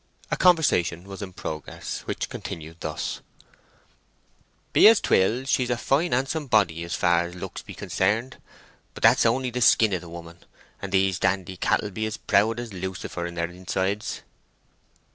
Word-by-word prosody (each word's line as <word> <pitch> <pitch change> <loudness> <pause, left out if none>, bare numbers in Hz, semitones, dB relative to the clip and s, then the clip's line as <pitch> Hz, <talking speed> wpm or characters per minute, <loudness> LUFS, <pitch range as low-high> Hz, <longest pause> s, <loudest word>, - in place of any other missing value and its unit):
A - - +2
conversation 140 - +3
was 100 +1 -9
in 100 -2 -6
progress, 80 -4 -6
which - - -3
continued 80 0 -7
thus:— 80 -2 -4 1.5
"Be - - +8
as 225 -1 +7
'twill, 115 +7 +2
she's 130 -2 +1
a 120 - 0
fine 150 +8 +1
handsome 135 +4 -1
body 95 -8 +2
as 85 -2 -3
far's 85 +2 +1
looks 95 +1 -7
be - - -11
concerned. 115 +7 -1 0.6
But - - -9
that's - - +6
only 125 +2 0
the 125 +1 -3
skin 110 -2 +5
of 90 - -1
the 85 - -11
woman, 85 0 -10 0.4
and 100 - -5
these 95 -1 +2
dandy 95 -1 0
cattle 105 +3 0
be 110 +3 -2
as 110 +2 -5
proud 110 +3 +2
as 120 -2 -6
a 95 - -8
lucifer 90 -1 -4
in 85 - -8
their 85 0 -2
insides." 95 +3 -3
95 Hz, 165 wpm, -25 LUFS, 85-120 Hz, 1.5 s, Be